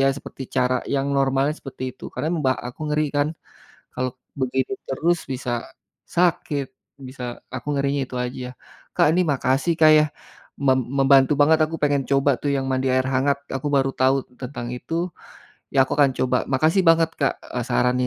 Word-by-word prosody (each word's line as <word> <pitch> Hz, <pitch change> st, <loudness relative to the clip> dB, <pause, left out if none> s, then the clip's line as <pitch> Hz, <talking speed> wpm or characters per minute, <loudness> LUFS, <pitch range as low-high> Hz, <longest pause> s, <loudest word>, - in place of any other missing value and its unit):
ya -, -, +4 dB
seperti 140 Hz, -, -9 dB
cara 125 Hz, 0 st, +2 dB, 0.2 s
yang 135 Hz, 0 st, 0 dB
normalnya 135 Hz, +2 st, +2 dB
seperti 130 Hz, -1 st, -9 dB
itu. -, -, -14 dB
Karena 155 Hz, -, -2 dB
mba 130 Hz, -3 st, +3 dB, 0.2 s
aku 125 Hz, -, -13 dB
ngeri 150 Hz, +1 st, +1 dB
kan 145 Hz, +1 st, +2 dB, 0.7 s
kalau 130 Hz, 0 st, -1 dB, 0.3 s
begini 130 Hz, +6 st, -1 dB
terus 165 Hz, +6 st, +1 dB
bisa 125 Hz, -1 st, -3 dB, 0.6 s
sakit, 170 Hz, -5 st, +1 dB, 0.4 s
bisa 130 Hz, -1 st, -9 dB, 0.3 s
aku -, -, -7 dB
ngerinya 140 Hz, 0 st, 0 dB
itu 130 Hz, -, -8 dB
aja. 125 Hz, 0 st, -6 dB, 0.5 s
Kak -, -, +4 dB
ini 180 Hz, +2 st, +3 dB
makasih 135 Hz, +5 st, +1 dB
Kak 155 Hz, 0 st, +8 dB
ya, 150 Hz, -, +5 dB, 0.6 s
mem 130 Hz, -1 st, +4 dB, 0.2 s
membantu 135 Hz, 0 st, +5 dB
banget 155 Hz, +2 st, +5 dB
aku 160 Hz, +1 st, -5 dB
pengen 145 Hz, -2 st, +2 dB
coba 140 Hz, +1 st, +4 dB
tuh 145 Hz, -, -1 dB
yang 135 Hz, -1 st, -1 dB
mandi 130 Hz, 0 st, 0 dB
air 130 Hz, 0 st, +2 dB
hangat, 140 Hz, +2 st, +2 dB, 0.2 s
aku 140 Hz, +2 st, -2 dB
baru 135 Hz, -1 st, +3 dB
tahu 130 Hz, +1 st, +4 dB, 0.3 s
tentang 125 Hz, -2 st, -5 dB
itu. 125 Hz, -, -8 dB, 0.8 s
Ya 140 Hz, -, 0 dB
aku -, -, -7 dB
akan 140 Hz, -2 st, +5 dB
coba. 130 Hz, 0 st, +2 dB, 0.2 s
Makasih 155 Hz, +8 st, +3 dB
banget 165 Hz, 0 st, +5 dB
Kak, 135 Hz, -, +3 dB, 0.2 s
eee, 125 Hz, -, -2 dB
sarannya. 125 Hz, 0 st, +2 dB
135 Hz, 175 wpm, -23 LUFS, 130-150 Hz, 0.8 s, Kak